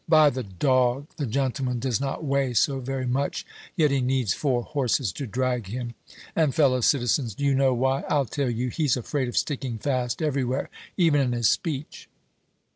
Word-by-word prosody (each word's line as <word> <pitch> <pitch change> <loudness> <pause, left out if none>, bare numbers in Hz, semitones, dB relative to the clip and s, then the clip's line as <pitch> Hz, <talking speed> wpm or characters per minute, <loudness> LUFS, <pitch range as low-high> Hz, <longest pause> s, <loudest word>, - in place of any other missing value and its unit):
By 155 -2 +6
the 130 - -3
dog! 125 - +1
the 145 -5 -2
gentleman 130 +1 -1
does 125 -1 -1
not 140 +3 -3
weigh 135 -3 0
so 135 +4 +2
very 130 0 -3
much, 130 +3 -1 0.3
yet 155 -5 +3
he 140 -1 +1
needs 125 -5 +1
four 125 -5 0
horses 130 - 0
to 135 +9 -6
drag 125 -1 -1
him. 120 +3 -5 0.4
And, 155 -5 +2
fellow 130 -5 +3
citizens, 120 -3 +1
do 140 - -2
you 140 - +3
know 135 -1 +3
why? 130 +2 +1
I'll 145 -2 +2
tell 135 +2 -2
you. 120 +2 -1
He's 140 0 +1
afraid 130 +2 -2
of 120 - -4
sticking 130 -5 -1
fast 125 -1 -1
everywhere, 135 -3 -1 0.3
even 160 -5 +4
in 125 -2 0
his 120 -2 +2
speech." 155 -4 -3
130 Hz, 185 wpm, -25 LUFS, 125-140 Hz, 0.4 s, By